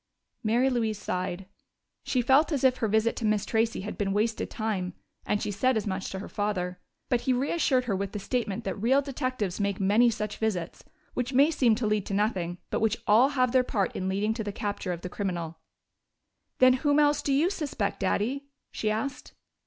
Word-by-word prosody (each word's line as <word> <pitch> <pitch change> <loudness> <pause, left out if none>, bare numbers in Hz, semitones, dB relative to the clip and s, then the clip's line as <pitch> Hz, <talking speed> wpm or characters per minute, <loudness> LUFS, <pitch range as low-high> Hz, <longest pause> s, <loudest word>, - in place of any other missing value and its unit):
Mary 235 +4 +3
Louise 230 -5 0
sighed: 185 -1 -3 0.6
she 250 -2 0
felt 270 +7 +4
as 280 -4 -1
if 255 -1 +4
her 225 - 0
visit 220 +2 +2
to - - -5
Miss 215 -1 +1
Tracey 225 -1 0
had 210 - -6
been 195 -1 0
wasted 220 +2 0
time, 200 -5 -2 0.3
and 210 - +1
she - - -2
said 245 +5 +2
as 215 - -2
much 190 -2 -3
to 190 - -5
her 190 - -6
father. 180 -4 -2 0.3
But 245 -3 +2
he 260 - +1
reassured 260 0 +1
her 210 -5 0
with 195 0 -3
the - - -4
statement 225 0 -2
that 205 - -4
real 265 +5 +3
detectives 255 -8 -3
make 200 -1 -1
many 210 +5 +4
such 210 -2 -3
visits, 190 -7 -2 0.3
which 250 +2 -2
may 280 +5 +5
seem 245 -7 +3
to 230 +1 -2
lead 210 -2 0
to 195 - -2
nothing, 185 -5 0
but - - 0
which 220 0 +2
all 230 +6 +5
have 255 -1 +3
their 260 0 +5
part 205 -6 -1
in 190 0 -2
leading 205 +3 0
to 220 -1 -4
the 205 - -3
capture 205 -3 -3
of 170 -1 -4
the - - -5
criminal. 175 -4 -4 1.0
"Then 255 0 +6
whom 290 -1 +3
else 295 -1 +4
do 280 - -1
you 305 +7 +3
suspect, 285 - -2
Daddy?" 245 +9 -1 0.2
she 215 - -1
asked. 255 +5 -3
220 Hz, 205 wpm, -28 LUFS, 200-255 Hz, 1.0 s, Then